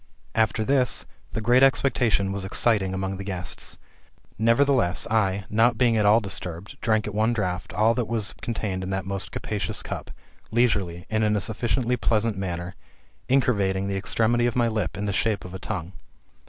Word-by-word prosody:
After 110 0 +1
this, 130 +1 +2 0.3
a 115 - -1
great 120 +4 +4
expectation 125 -7 +3
was 100 0 -3
excited 95 0 +2
among 95 0 -3
the 100 - -6
guests. 90 -4 -4 0.6
Nevertheless, 115 -5 +3
I, 100 -3 +1
not 115 +2 +3
being 120 -2 +3
at 105 -2 +3
all 105 +2 +6
disturbed, 95 0 -4
drank, 110 -2 +1
at 105 - -5
one 110 +3 +2
draught, 90 -6 -2
all 110 +2 +3
that 120 -2 -1
was 110 -2 -1
contained 105 -5 -3
in 95 - -4
that 95 -1 -2
most 95 -3 -4
capacious 105 -2 -2
cup, - - -6 0.4
leisurely, 100 -7 +1
and 110 0 +1
in 105 0 +2
a - - +2
sufficiently 120 +4 0
pleasant 110 -1 +1
manner, 90 -2 -4 0.6
incurvating 100 -7 +2
the 100 - -2
extremity 115 +5 +1
of 120 - -2
my 120 -2 +3
lip 110 -5 -2
in 105 - -3
the 100 - -1
shape 105 -1 0
of 90 - -9
a 95 - -6
tongue. 95 -3 -5
105 Hz, 180 wpm, -25 LUFS, 95-115 Hz, 0.6 s, all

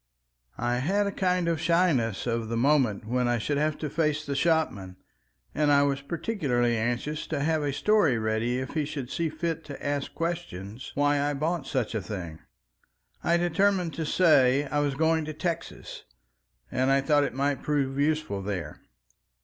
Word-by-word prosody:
I 120 +1 0
had 195 +11 +1
a 200 - -1
kind 180 -2 0
of 165 -2 0
shyness 165 - +2
of 115 -2 -2
the 115 - -1
moment 125 -5 +2
when 125 +2 0
I 120 0 +2
should 145 +5 -1
have 155 0 0
to 155 - -3
face 150 0 0
the 140 - -3
shopman, 135 - 0 0.6
and 150 -1 +2
I 140 0 +5
was 140 -1 0
particularly 140 - 0
anxious 120 +7 -2
to 155 - -2
have 160 0 +1
a 145 -1 0
story 165 - +3
ready 110 +2 0
if 130 +1 -4
he 155 - 0
should 140 -3 -5
see 165 -2 -1
fit 160 +1 -3
to 145 -2 -8
ask 145 -1 -2
questions 135 - -4
why 145 0 +2
I 145 0 0
bought 155 +1 -2
such 125 -5 -1
a 110 - -1
thing. 85 -4 -6 0.8
I 170 - +3
determined 175 0 +1
to 160 +2 -3
say 145 -6 +4
I 145 +1 -1
was 145 -2 0
going 160 +2 +2
to 155 - -5
Texas, 165 +1 -5 0.7
and 130 +1 +1
I 135 0 +4
thought 145 +1 +3
it 140 - -3
might 140 0 0
prove 140 -2 -1
useful 150 -9 0
there. 95 -6 -5
145 Hz, 180 wpm, -27 LUFS, 120-160 Hz, 0.8 s, I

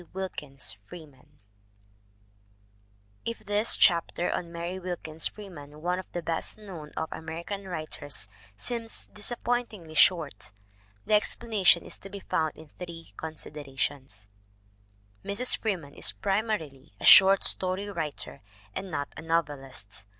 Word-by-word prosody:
WILKINS 150 - -4
FREEMAN 145 -4 -13 1.9
IF 230 -2 -4
this 205 +2 +3
chapter 170 0 +4
on 170 -1 -3
Mary 170 +2 -4
Wilkins 170 -3 -3
Freeman, 150 -8 -10
one 180 +1 +1
of 185 - -9
the 175 - -3
best 165 +5 -1
known 180 -8 -8
of 160 - 0
American 170 +5 -5
writers, 155 - -2 0.3
seems 230 - -2
dis 205 0 -1
appointingly 235 -9 -2
short, 155 - +3 0.5
the - - +1
explanation 210 -4 +4
is - - -3
to 195 - -10
be 200 0 -6
found 160 -4 0
in 160 -1 -12
three 165 - -8
considerations: 140 -6 -4 1.0
Mrs. 225 +6 +2
Freeman 175 -10 -2
is - - +2
primarily 195 - -1
a - - -3
short 195 0 +10
story 185 +2 +3
writer 160 -7 -3 0.3
and 195 - -4
not 145 -4 -2
a - - -7
novelist. 135 -11 -2
170 Hz, 125 wpm, -29 LUFS, 150-195 Hz, 1.9 s, short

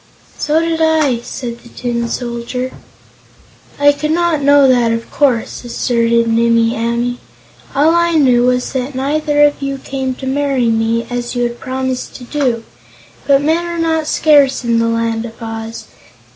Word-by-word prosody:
"So 305 +1 +1
did 330 0 -1
I," 310 -6 +2
said 235 0 -6
the 235 - -15
Tin 235 -1 -3
Soldier. 245 +1 -4 1.1
"I 290 0 +6
could 290 +1 -3
not 335 -2 +1
know 285 0 +5
that, 245 -3 +3
of 230 0 -4
course," 255 -6 0
asserted 235 -1 +1
Nimmie 230 0 +2
Amee. 235 +2 -1 0.6
"All 300 +4 +4
I 340 0 +2
knew 260 -6 +4
was 250 0 0
that 260 +1 -3
neither 295 +2 +1
of 290 -1 +2
you 275 0 -3
came 265 -1 -4
to 265 - -8
marry 270 -3 0
me, 225 +1 0
as 245 0 -3
you 245 - 0
had 240 0 -3
promised 260 -1 -4
to 250 - -9
do. 245 -3 -1 0.6
But 280 0 +4
men 320 +3 +1
are 345 0 -4
not 320 -2 0
scarce 285 -5 +3
in 235 -1 +1
the 230 - +1
Land 230 0 -1
of 230 -1 -9
Oz. 225 -1 -6
255 Hz, 165 wpm, -15 LUFS, 235-290 Hz, 1.1 s, I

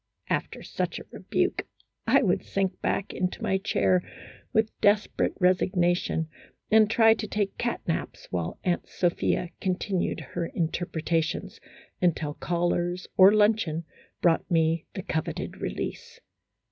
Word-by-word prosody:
After - - -2
such - - -3
a - - -8
rebuke, - - -1 0.4
I - - +5
would - - +1
sink 195 -1 -2
back 200 - -1
into 180 0 -2
my 190 - +1
chair 185 -2 +2 0.5
with 220 0 +2
desperate 205 +1 +2
resignation, 180 -3 +2 0.4
and 215 -1 +6
try 225 0 +6
to 215 -1 -4
take 205 -1 -1
cat 240 0 -1
naps 165 - -3
while 85 -2 -2
Aunt 175 -2 -1
Sophia 175 0 0
continued 185 0 -1
her 165 - -2
interpre 165 -1 -2
tations, 165 -2 -1 0.4
until 160 -4 +1
callers 175 +2 -1
or 190 +1 +8
luncheon 210 -6 +2 0.4
brought 170 -2 +3
me 165 -1 +2
the 190 - -4
coveted 160 -5 -3
release. - - -5
180 Hz, 130 wpm, -27 LUFS, 170-200 Hz, 0.5 s, or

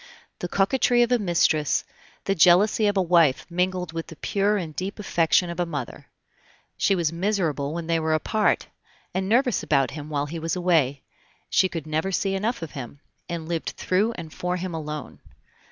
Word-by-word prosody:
The 180 - -3
coquetry 240 +6 +3
of 240 - -1
a 245 - +4
mistress, 165 -6 +2 0.4
the 195 - +2
jealousy 195 +5 +5
of 205 -1 +1
a - - +4
wife 165 -6 +3
mingled 180 -1 -1
with 165 0 -4
the 165 - -10
pure 205 +5 0
and 160 -5 -5
deep 190 +2 -4
affection 175 -3 +2
of 170 - -7
a 175 - +2
mother. 145 -7 -6 0.7
She 195 - +2
was 165 -3 0
miserable 170 -6 -1
when 170 -1 -4
they 165 0 +1
were 160 0 +1
apart, 210 +7 +1 0.5
and 190 +1 -1
nervous 245 -1 +3
about 135 -3 +1
him 150 0 -7
while 145 -1 -1
he 165 +3 -6
was 165 +2 -2
away; 160 -7 +1 0.5
she 185 - +4
could 165 -4 -5
never 155 +5 -1
see 195 +1 0
enough 210 +1 -1
of 160 - -6
him, 135 0 -8 0.3
and 165 -2 -4
lived 165 -1 -3
through 205 +5 +1
and 160 -5 -9
for 180 0 -2
him 180 0 -4
alone. 150 -3 -6
175 Hz, 185 wpm, -25 LUFS, 155-195 Hz, 0.7 s, jealousy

